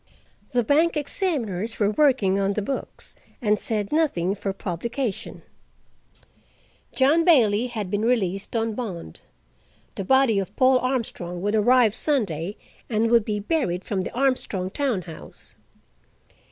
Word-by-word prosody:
The 245 Hz, -1 st, +2 dB
bank 310 Hz, +7 st, +2 dB
examiners 235 Hz, -, -2 dB
were 205 Hz, -1 st, +2 dB
working 220 Hz, -7 st, +3 dB
on 195 Hz, 0 st, +1 dB
the 210 Hz, -, -1 dB
books, 270 Hz, +6 st, -5 dB, 0.2 s
and 210 Hz, -2 st, +1 dB
said 210 Hz, -3 st, -2 dB
nothing 235 Hz, -, +1 dB
for 200 Hz, -1 st, -3 dB
publication: 210 Hz, -, -4 dB, 1.5 s
John 290 Hz, +5 st, +4 dB
Bailey 245 Hz, -, +4 dB
had 215 Hz, -6 st, -5 dB
been 205 Hz, -, 0 dB
released 205 Hz, -4 st, 0 dB
on 225 Hz, -1 st, 0 dB
bond. 190 Hz, -, -6 dB, 0.8 s
The 195 Hz, -, -3 dB
body 265 Hz, -1 st, +3 dB
of 195 Hz, -, -5 dB
Paul 255 Hz, 0 st, +4 dB
Armstrong 230 Hz, -9 st, -3 dB
would 205 Hz, +1 st, 0 dB
arrive 225 Hz, 0 st, +4 dB
Sunday 205 Hz, -, -1 dB, 0.3 s
and 225 Hz, 0 st, +1 dB
would 235 Hz, -2 st, +5 dB
be 210 Hz, -1 st, -2 dB
buried 205 Hz, -, -1 dB
from 195 Hz, -3 st, -2 dB
the -, -, -5 dB
Armstrong 240 Hz, -8 st, 0 dB
town 250 Hz, -9 st, -1 dB
house. 160 Hz, -2 st, -10 dB
220 Hz, 135 wpm, -24 LUFS, 195-260 Hz, 1.5 s, would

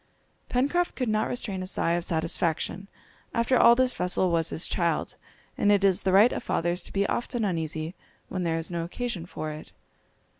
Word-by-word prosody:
Pencroft 285 Hz, +8 st, +1 dB
could 255 Hz, -4 st, -1 dB
not 215 Hz, 0 st, +1 dB
restrain 200 Hz, -6 st, -3 dB
a 185 Hz, -, -4 dB
sigh 170 Hz, -, 0 dB
of 170 Hz, 0 st, 0 dB
satisfaction. 165 Hz, +3 st, -1 dB, 0.5 s
After 235 Hz, +2 st, +2 dB
all 235 Hz, -1 st, +7 dB
this 255 Hz, 0 st, +2 dB
vessel 180 Hz, 0 st, 0 dB
was 165 Hz, -1 st, +1 dB
his 165 Hz, -, -1 dB
child, 170 Hz, -3 st, -1 dB, 0.4 s
and 205 Hz, -, +4 dB
it 200 Hz, -1 st, +3 dB
is 195 Hz, 0 st, +3 dB
the 190 Hz, -, +1 dB
right 205 Hz, +6 st, +6 dB
of -, -, -3 dB
fathers 175 Hz, +2 st, 0 dB
to -, -, -8 dB
be 200 Hz, 0 st, +1 dB
often 240 Hz, 0 st, -1 dB
uneasy 160 Hz, -2 st, -2 dB, 0.3 s
when 185 Hz, -, -4 dB
there 165 Hz, -2 st, 0 dB
is 165 Hz, +2 st, -4 dB
no 170 Hz, -1 st, -2 dB
occasion 180 Hz, -1 st, -4 dB
for 155 Hz, -3 st, -5 dB
it. 150 Hz, 0 st, -9 dB
185 Hz, 190 wpm, -27 LUFS, 165-225 Hz, 0.5 s, all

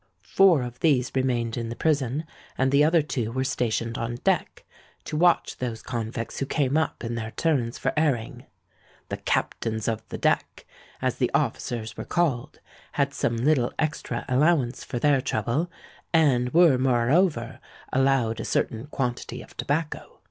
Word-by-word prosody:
Four 175 Hz, -, +5 dB
of 125 Hz, 0 st, -7 dB
these 135 Hz, -6 st, +2 dB
remained 125 Hz, -3 st, 0 dB
in 115 Hz, -1 st, -3 dB
the 115 Hz, -, -5 dB
prison; 145 Hz, +1 st, 0 dB, 0.3 s
and 130 Hz, 0 st, +2 dB
the 140 Hz, +1 st, +5 dB
other 160 Hz, +1 st, +4 dB
two 120 Hz, -7 st, -2 dB
were 130 Hz, +2 st, -1 dB
stationed 115 Hz, -4 st, -1 dB
on 115 Hz, +1 st, -3 dB
deck, -, -, 0 dB, 0.4 s
to -, -, -5 dB
watch 175 Hz, +2 st, +3 dB
those 120 Hz, -3 st, -4 dB
convicts 115 Hz, -2 st, -4 dB
who 135 Hz, -, -2 dB
came 140 Hz, -2 st, 0 dB
up 160 Hz, -5 st, 0 dB
in 115 Hz, 0 st, -3 dB
their 115 Hz, -1 st, -3 dB
turns 125 Hz, -4 st, 0 dB
for -, -, -1 dB
airing. 140 Hz, -7 st, -1 dB, 0.6 s
The -, -, -3 dB
Captains 110 Hz, -2 st, -1 dB
of 110 Hz, -1 st, -1 dB
the -, -, -5 dB
Deck, -, -, 0 dB, 0.4 s
as -, -, 0 dB
the -, -, +1 dB
officers 110 Hz, -3 st, -2 dB
were -, -, -4 dB
called, 150 Hz, -5 st, -1 dB, 0.3 s
had 140 Hz, -1 st, 0 dB
some 115 Hz, -, -1 dB
little 125 Hz, 0 st, +2 dB
extra 150 Hz, -6 st, -2 dB
allowance 135 Hz, -1 st, +2 dB
for 125 Hz, -, -5 dB
their 140 Hz, +1 st, +3 dB
trouble, 125 Hz, +10 st, -1 dB, 0.4 s
and 130 Hz, -7 st, +3 dB
were 165 Hz, -6 st, +5 dB
moreover 130 Hz, +1 st, +2 dB, 0.3 s
allowed 130 Hz, -4 st, +2 dB
a -, -, -3 dB
certain 115 Hz, +4 st, -1 dB
quantity 125 Hz, -4 st, -3 dB
of -, -, -17 dB
tobacco. 150 Hz, +2 st, -3 dB
130 Hz, 160 wpm, -25 LUFS, 115-150 Hz, 0.6 s, Four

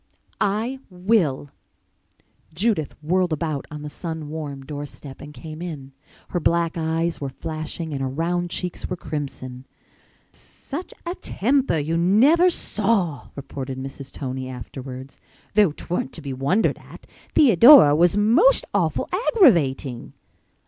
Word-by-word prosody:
"I 220 Hz, +6 st, 0 dB
will!" 180 Hz, -8 st, 0 dB, 1.0 s
Judith 190 Hz, -5 st, 0 dB
whirled 180 Hz, +2 st, +1 dB
about 155 Hz, -2 st, -2 dB
on 150 Hz, -1 st, -8 dB
the -, -, -5 dB
sun 160 Hz, -1 st, -6 dB
warm 145 Hz, -3 st, -6 dB
door 145 Hz, 0 st, -5 dB
step 135 Hz, -1 st, -11 dB
and 145 Hz, -, -9 dB
came 155 Hz, +1 st, -9 dB
in. 150 Hz, -6 st, -7 dB, 0.4 s
Her 175 Hz, -, -1 dB
black 170 Hz, 0 st, +1 dB
eyes 165 Hz, 0 st, -1 dB
were 140 Hz, -, -2 dB
flashing 155 Hz, +2 st, -6 dB
and 135 Hz, -, -3 dB
her 135 Hz, -, -1 dB
round 175 Hz, +5 st, -1 dB
cheeks 180 Hz, 0 st, -4 dB
were 180 Hz, -, -2 dB
crimson. 135 Hz, -5 st, -6 dB, 0.6 s
"Such 310 Hz, +6 st, -8 dB
a 345 Hz, -, -2 dB
temper 265 Hz, -, 0 dB
you 155 Hz, +3 st, -1 dB
never 260 Hz, -, +5 dB
saw!" 195 Hz, -, -1 dB
reported 135 Hz, -1 st, -6 dB
Mrs. 135 Hz, 0 st, -7 dB
Tony 130 Hz, -1 st, -5 dB
afterwards. 130 Hz, +1 st, -8 dB, 0.3 s
"Though 205 Hz, -5 st, +4 dB
'tweren't 150 Hz, -2 st, -4 dB
to -, -, -8 dB
be 140 Hz, -2 st, -4 dB
wondered 140 Hz, +12 st, +1 dB
at. -, -, -14 dB, 0.3 s
Theodora 235 Hz, -, +8 dB
was 175 Hz, +5 st, +3 dB
most 260 Hz, -, +4 dB
awful -, -, 0 dB
aggravating." 170 Hz, -, +2 dB
160 Hz, 135 wpm, -23 LUFS, 140-195 Hz, 1.0 s, Theodora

